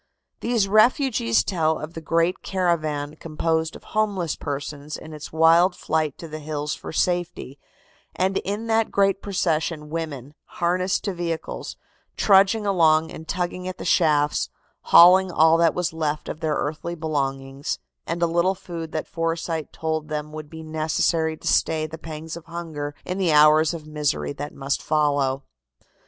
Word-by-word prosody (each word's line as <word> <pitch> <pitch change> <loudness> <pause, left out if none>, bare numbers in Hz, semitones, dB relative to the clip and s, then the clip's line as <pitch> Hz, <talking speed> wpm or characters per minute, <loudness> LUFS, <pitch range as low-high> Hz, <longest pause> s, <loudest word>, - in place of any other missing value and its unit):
These 230 -4 +1
refugees 215 - +3
tell 160 - 0
of 155 +2 -7
the 165 - -7
great 165 +3 +1
caravan 155 -5 -1
composed 160 0 -1
of - - -12
homeless 200 -6 -1
persons 145 +1 -5
in 155 - -10
its 150 -1 -8
wild 165 +3 +5
flight 155 -3 -1
to 165 - -8
the 155 0 -7
hills 150 0 -3
for - - -7
safety, 175 -5 -1 0.6
and 190 +1 +1
in 205 +3 -4
that 225 -1 +2
great 195 0 +2
procession 165 -5 -1
women, 150 -5 -5 0.2
harnessed 180 +2 +1
to 200 - -2
vehicles, 170 -2 -4 0.4
trudging 200 +2 +4
along 160 -5 +3
and 160 - -9
tugging 180 0 -3
at 185 - -5
the - - -7
shafts, 150 -4 +2 0.4
hauling 185 +2 +7
all 160 -1 +5
that 165 -1 +3
was 180 -2 -1
left 155 -2 -2
of - - -5
their 155 -2 0
earthly 160 +4 -3
belongings, 135 -3 -3 0.3
and 170 +1 -1
a - - +6
little 170 +3 +1
food 165 -3 -7
that 155 - -3
foresight 165 -1 -2
told 160 -1 -3
them 150 0 -4
would 155 -1 -8
be 160 0 -9
necessary 160 +1 0
to - - -8
stay 160 -1 +2
the 155 +1 -8
pangs 160 0 -7
of 170 - -10
hunger 155 -4 -6
in 185 +2 -3
the 180 -4 +2
hours 155 +1 +6
of 165 -3 -7
misery 145 - -1
that 145 +1 -6
must 140 0 -2
follow. 140 -3 +1
160 Hz, 160 wpm, -24 LUFS, 150-175 Hz, 0.6 s, hauling